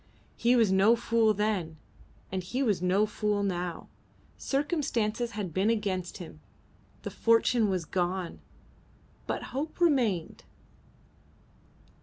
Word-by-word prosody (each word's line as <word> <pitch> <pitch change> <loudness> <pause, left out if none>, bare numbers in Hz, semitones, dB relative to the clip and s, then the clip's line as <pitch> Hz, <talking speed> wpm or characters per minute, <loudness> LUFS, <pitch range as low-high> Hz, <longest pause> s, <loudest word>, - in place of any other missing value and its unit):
He 240 +1 +3
was 225 -5 +4
no 195 +5 +5
fool 230 -1 +2
then, 195 -6 -1 0.5
and 190 0 -2
he 245 +10 -2
was 210 -8 +1
no 185 +3 +3
fool 210 -1 -1
now. 180 -3 -3 0.5
Circumstances 260 -6 -1
had 195 -6 -4
been 195 +5 +2
against 195 -5 -1
him; 160 - -10 0.6
the - - -5
fortune 230 -1 +3
was 185 -3 -1
gone, 180 +1 -2 0.9
but - - -2
hope 295 +6 -4
remained. 245 - +1
210 Hz, 115 wpm, -29 LUFS, 185-235 Hz, 0.9 s, no